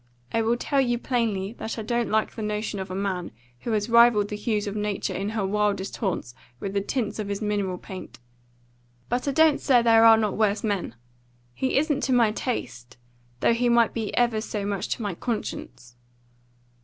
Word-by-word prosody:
I 225 - +2
will 230 +2 +1
tell 275 +2 +1
you 240 -2 +1
plainly 225 -5 -1
that 225 - -4
I 220 - -4
don't 235 +1 -1
like 220 0 +1
the 225 - -7
notion 210 -1 -3
of 190 0 -5
a 185 - -5
man 190 -3 -2 0.3
who 235 - -4
has 210 0 0
rivalled 235 -3 +5
the 210 - -3
hues 210 0 -1
of 205 0 -4
nature 210 -1 -2
in 195 +2 -2
her 215 -3 -1
wildest 205 -1 -1
haunts 180 - -2 0.3
with 195 +5 -4
the 200 - +1
tints 215 0 -2
of 210 - -3
his 200 0 -3
mineral 205 -4 -1
paint; 185 +1 -9 0.9
but 245 +3 -1
I - - +2
don't 315 +1 +4
say 250 -4 +4
there 225 -1 +6
are 225 -1 +8
not 215 -2 0
worse 215 -1 +1
men. 200 - -2 0.6
He 260 - 0
isn't 295 -1 +1
to 260 - +1
my 235 -3 +4
taste, 125 - -5 0.4
though - - +4
he 240 +1 +1
might 235 -1 +4
be 225 -3 -3
ever 235 -3 +2
so 210 -2 -4
much 200 -2 -2
to 230 - -7
my 205 -3 -2
conscience." 170 - -5
215 Hz, 200 wpm, -25 LUFS, 200-235 Hz, 0.9 s, are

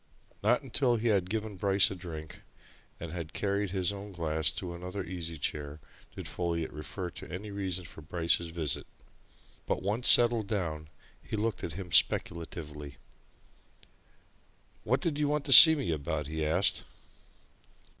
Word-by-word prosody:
Not 120 +6 +1
until 125 -1 0
he 115 +1 -2
had 95 -4 0
given 110 -1 -5
Bryce 100 +1 +2
a - - -6
drink, 80 -4 -10 0.6
and 85 -1 -8
had 85 -2 -8
carried 100 0 -2
his 95 0 -1
own 100 0 -10
glass 80 -3 -1
to 90 -2 -7
another 90 +3 -7
easy 85 -2 -7
chair 75 +1 -5 0.4
did - - -8
Folliot 85 -2 -4
refer 85 +4 -7
to - - -11
any 100 +4 -8
reason 95 -3 -4
for 80 - -13
Bryce's 85 +1 -1
visit. 80 -3 -4 0.8
But - - -3
once 105 +6 -1
settled 120 -3 +5
down, 80 -7 -4 0.3
he - - -7
looked 110 0 -3
at 80 - -5
him 90 0 -9
speculatively. 75 -5 -1 1.9
"What 130 +4 -1
did 155 -4 -3
you 150 - 0
want 150 0 -2
to 135 - +5
see 160 +5 +14
me 95 - -4
about?" 75 0 -4
he 80 +2 -5
asked. 85 +6 0
90 Hz, 155 wpm, -28 LUFS, 80-105 Hz, 1.9 s, see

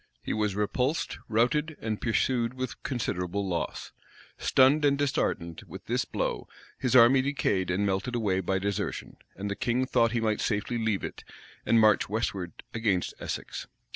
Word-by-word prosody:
He - - -2
was 105 -2 0
repulsed, 125 +9 -1
routed, 145 +8 +1
and 110 -1 -3
pursued 120 +1 +1
with 130 -1 -5
considerable 100 -6 -2
loss.[*] 85 -2 -3 0.5
Stunned 135 +3 +4
and 140 -1 +4
disheartened 85 - -1
with - - -10
this - - 0
blow, - - -2 0.3
his 125 0 +1
army 125 +2 +7
decayed 115 -9 0
and 95 +3 +1
melted 100 +6 -1
away 100 -5 +1
by 95 +1 0
desertion; 100 +1 -3 0.2
and 100 +2 -4
the 100 - -2
king 125 +4 0
thought 115 -2 +2
he 120 - +1
might 110 -2 0
safely 110 +2 -1
leave 110 -3 0
it, - - -6 0.4
and 115 - +5
march 110 -3 +4
westward 100 -5 -3
against 105 -6 0
Essex. - - -5
110 Hz, 160 wpm, -28 LUFS, 100-125 Hz, 0.5 s, army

